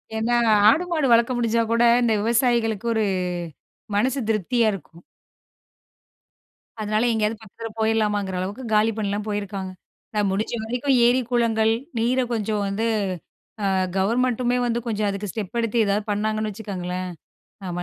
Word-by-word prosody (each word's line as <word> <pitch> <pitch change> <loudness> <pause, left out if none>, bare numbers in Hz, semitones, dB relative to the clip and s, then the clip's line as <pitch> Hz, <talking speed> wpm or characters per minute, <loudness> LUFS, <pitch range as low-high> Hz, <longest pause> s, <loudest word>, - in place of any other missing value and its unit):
ஏன்னா 230 +2 +1 0.3
ஆடு 325 +10 +3
மாடு 310 -5 +1
வளர்க்க 235 +2 +4
முடிஞ்சா 230 -1 +1
கூட 230 +1 +3 0.2
இந்த 235 -2 +2
விவசாயிகளுக்கு 235 -2 +1
ஒரு 220 -1 +1 0.9
மனசு 260 +6 +1
திருப்தியா 225 +2 +1
இருக்கும். 170 -2 -11 1.8
அதனால 215 +1 0
எங்கேயாவது 220 0 -1
பக்கத்தில 225 +2 -8
போயிரலாமாங்கிற 210 -3 0
அளவுக்கு 200 +8 -4
காலி 215 +1 +4
பண்ணலாம் 205 0 -2
போயிருக்காங்க. 200 -2 -4 0.4
நான் 210 -1 +1
முடிஞ்ச 210 +5 -2
வரைக்கும் 250 +4 0
ஏரி 245 +2 +4
குளங்கள், 225 -2 +2 0.3
நீரை 250 +3 +2
கொஞ்சம் 215 -1 -1
வந்து 200 +3 -1 0.8
அ - - +1 0.3
கவர்மென்ட்டுமே 245 +4 +1
வந்து 235 0 0
கொஞ்சம் 210 -2 0
அதுக்கு 200 +1 -4
ஸ்டெப் 215 +3 -5
எடுத்து 230 0 -1
ஏதாவது 200 +1 0
பண்ணாங்கன்னு 215 +1 -1
வச்சுக்கோங்களேன், 185 -3 -5 0.6
ஆமா 175 0 -3
220 Hz, 130 wpm, -23 LUFS, 205-235 Hz, 1.8 s, வளர்க்க